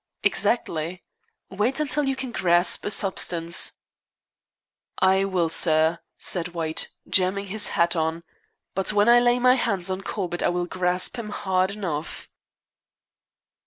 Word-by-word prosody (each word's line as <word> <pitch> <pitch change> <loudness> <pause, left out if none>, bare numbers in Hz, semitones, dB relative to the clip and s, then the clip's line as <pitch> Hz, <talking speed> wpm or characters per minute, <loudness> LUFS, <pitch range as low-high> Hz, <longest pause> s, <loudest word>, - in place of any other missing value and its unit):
"Exactly. 175 -5 -1 0.5
Wait 215 +9 0
until 300 -1 0
you 270 0 0
can 265 -2 -5
grasp 175 -4 +2
a - - -1
substance." 175 -4 0 1.2
"I 190 +1 +3
will, 185 -4 0
sir," 160 0 +3 0.2
said 175 -1 -2
White, 160 -1 -1 0.2
jamming 195 +1 +2
his 215 -1 +2
hat 170 +1 +2
on; 160 +1 -2 0.5
"but 195 +2 -1
when 205 +1 +2
I 240 0 +7
lay 240 0 +3
my 250 0 +4
hands 195 -8 -1
on 185 +1 -3
Corbett 180 -3 -4
I - - +2
will 175 0 -1
grasp 180 +3 -2
him 215 -2 -6
hard 190 -2 0
enough." 170 -7 -5
185 Hz, 135 wpm, -24 LUFS, 170-210 Hz, 1.2 s, I